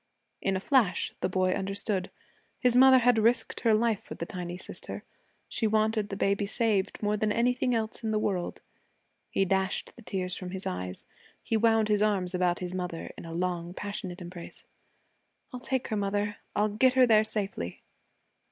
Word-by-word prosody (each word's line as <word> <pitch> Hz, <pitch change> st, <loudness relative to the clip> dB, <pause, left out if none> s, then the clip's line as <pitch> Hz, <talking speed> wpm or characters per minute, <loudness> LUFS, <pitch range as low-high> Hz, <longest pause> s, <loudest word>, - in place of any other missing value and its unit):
In 195 Hz, -, +1 dB
a -, -, 0 dB
flash, 220 Hz, -3 st, +2 dB
the 185 Hz, -, +1 dB
boy 185 Hz, 0 st, +2 dB
understood. 195 Hz, 0 st, -2 dB, 0.5 s
His 250 Hz, -2 st, +2 dB
mother 260 Hz, +1 st, +8 dB
had 245 Hz, -2 st, +4 dB
risked 230 Hz, +2 st, +2 dB
her 225 Hz, -2 st, +4 dB
life 220 Hz, -2 st, +2 dB
for -, -, -9 dB
the 170 Hz, -, -4 dB
tiny 175 Hz, 0 st, -5 dB
sister. -, -, -6 dB, 0.4 s
She 220 Hz, -, 0 dB
wanted 215 Hz, -1 st, +1 dB
the 195 Hz, -, -4 dB
baby 200 Hz, 0 st, +1 dB
saved 210 Hz, -3 st, 0 dB
more 210 Hz, 0 st, +2 dB
than 215 Hz, 0 st, +1 dB
anything 250 Hz, +2 st, +1 dB
in 225 Hz, -2 st, +1 dB, 0.2 s
the 215 Hz, -, +1 dB
world. 190 Hz, -4 st, -2 dB, 0.7 s
He 195 Hz, -, +1 dB
dashed 190 Hz, 0 st, -1 dB
the 240 Hz, -, -13 dB
tears 185 Hz, -4 st, -2 dB
from 185 Hz, -, -6 dB
his 190 Hz, +1 st, -6 dB
eyes. 90 Hz, 0 st, -4 dB, 0.4 s
He -, -, -1 dB
wound 225 Hz, -1 st, +3 dB
his 210 Hz, -1 st, +2 dB
arms 195 Hz, -4 st, +1 dB
about 180 Hz, -1 st, +1 dB
his 180 Hz, 0 st, -5 dB
mother 180 Hz, -2 st, -4 dB
in -, -, -10 dB
a 165 Hz, -, -7 dB
long 175 Hz, 0 st, -2 dB
passionate 190 Hz, -3 st, -5 dB
embrace. 175 Hz, -1 st, -8 dB, 0.9 s
'I'll 250 Hz, -, -5 dB
take 260 Hz, 0 st, -2 dB
her, 220 Hz, -, -1 dB
mother; 205 Hz, 0 st, -1 dB, 0.2 s
I'll 210 Hz, +1 st, +2 dB
get 250 Hz, +5 st, +3 dB
her 260 Hz, -1 st, +6 dB
there 220 Hz, -2 st, +5 dB
safely.' 200 Hz, -, -3 dB
205 Hz, 180 wpm, -29 LUFS, 185-220 Hz, 0.9 s, mother